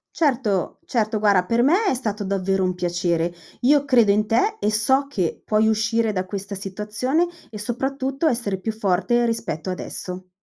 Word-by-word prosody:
Certo, 245 - 0
certo, 220 -2 0
guarda, 200 -4 +3
per 230 +4 +1
me 355 - +3
è - - +3
stato 215 -5 -3
davvero 195 0 0
un 185 0 +1
piacere, 175 -1 0 0.3
io 285 +3 +4
credo 240 -6 +4
in 210 +1 +2
te 325 - +1
e 210 - +1
so 265 +6 +2
che 185 - -2
puoi 215 0 +2
uscire 225 0 +1
da 185 -2 -2
questa 200 +1 -5
situazione, 210 - -1 0.2
e 210 - -7
soprattutto 270 +5 -2
essere 230 -8 0
più 220 +3 -2
forte 220 +3 +1
rispetto 190 -7 -3
adesso. 185 0 -6
215 Hz, 165 wpm, -22 LUFS, 190-245 Hz, 0.3 s, io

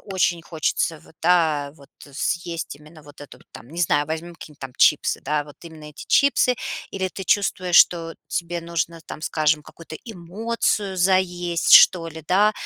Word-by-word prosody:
очень 180 -3 -1
хочется, 160 0 -2
вот 160 - -21
да, 160 -5 +2
вот 140 - -18 0.2
съесть 170 +3 -3
именно 150 +1 -17
вот 145 0 -16
это",- 145 - -12
там, 115 - -12
не 170 - -6
знаю, 145 -3 +2
возьмем 165 +2 -5
какие-нибудь 150 -2 -13
там 135 -1 -8
чипсы, - - +3
да, 150 +1 -1
вот 145 -1 -14
именно 160 -2 -12
эти 150 -1 -11
чипсы? 265 -3 +3 0.3
Или 190 -1 -2
ты 190 - -7
чувствуешь, 185 -2 +1
что 165 -1 +4
тебе 170 0 -3
нужно 170 0 -3
там, - - -9
скажем, 155 0 0
какую-то 165 +1 -12
эмоцию 205 0 -3
заесть, 180 -2 +1
что 165 -3 +5
ли, 160 -1 -11
да, 205 +5 +3
170 Hz, 165 wpm, -22 LUFS, 155-180 Hz, 0.3 s, что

